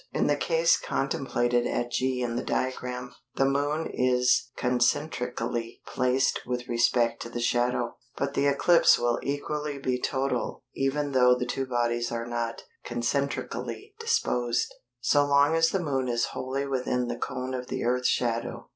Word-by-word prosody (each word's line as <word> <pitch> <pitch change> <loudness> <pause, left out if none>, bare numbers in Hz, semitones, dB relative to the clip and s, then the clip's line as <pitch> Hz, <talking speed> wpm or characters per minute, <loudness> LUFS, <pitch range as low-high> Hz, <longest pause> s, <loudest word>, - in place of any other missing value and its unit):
In - - +1
the 145 - +3
case 165 +2 +3
contemplated 120 -3 0
at 120 0 -2
G 130 0 0
in 120 -1 -2
the 120 - -1
diagram, 125 -1 -3 0.2
the 135 - +3
Moon 145 +3 0
is 125 0 +2
concentrically 125 -2 -1
placed 130 +1 +1
with 125 -1 -3
respect 120 0 +2
to 115 - -6
the 120 - -5
shadow, 120 0 0 0.2
but 140 0 -1
the 140 0 +2
eclipse 165 +5 +5
will 120 0 +1
equally 145 +1 -3
be 130 -2 -1
total 130 -3 -1
even 140 +2 -1
though 125 -1 +5
the 125 - -2
two 135 +2 -2
bodies 120 -1 0
are 115 0 -3
not 120 -1 -3 0.2
concentrically 140 - -3
disposed, 125 - 0 0.3
so 145 +4 +4
long 145 +2 +4
as 165 0 +4
the 195 - 0
Moon 140 -7 -1
is 120 -1 +1
wholly 135 +2 -2
within 125 -2 -1
the 120 - -2
cone 130 0 -3
of 125 -1 -4
the - - -3
Earth's 125 +1 +1
shadow. 115 -1 -1
125 Hz, 155 wpm, -27 LUFS, 120-140 Hz, 0.3 s, eclipse